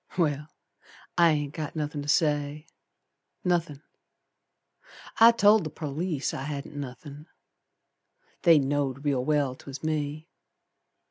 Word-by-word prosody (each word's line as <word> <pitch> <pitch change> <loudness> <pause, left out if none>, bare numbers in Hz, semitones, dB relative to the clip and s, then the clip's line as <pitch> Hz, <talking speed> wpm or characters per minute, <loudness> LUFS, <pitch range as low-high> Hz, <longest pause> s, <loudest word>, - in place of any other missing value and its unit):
Well! 150 -4 0 0.7
I 170 -1 +5
ain't 145 -1 -2
got 155 -1 -5
nothin' 150 -1 -3
to 145 - -8
say. 150 -1 +1 0.8
Nothin'! 165 -5 -1 1.4
I 230 +1 +9
told 215 -2 +5
the 155 - -4
perlice 155 +1 -3
I - - -4
hadn't 145 0 -6
nothin'. 145 +2 -8 1.1
They 170 -3 +6
know'd 140 -1 -1
real 135 -3 +1
well 145 -2 +1
'twas 135 +2 -10
me. 155 0 -2
150 Hz, 115 wpm, -27 LUFS, 145-160 Hz, 1.4 s, I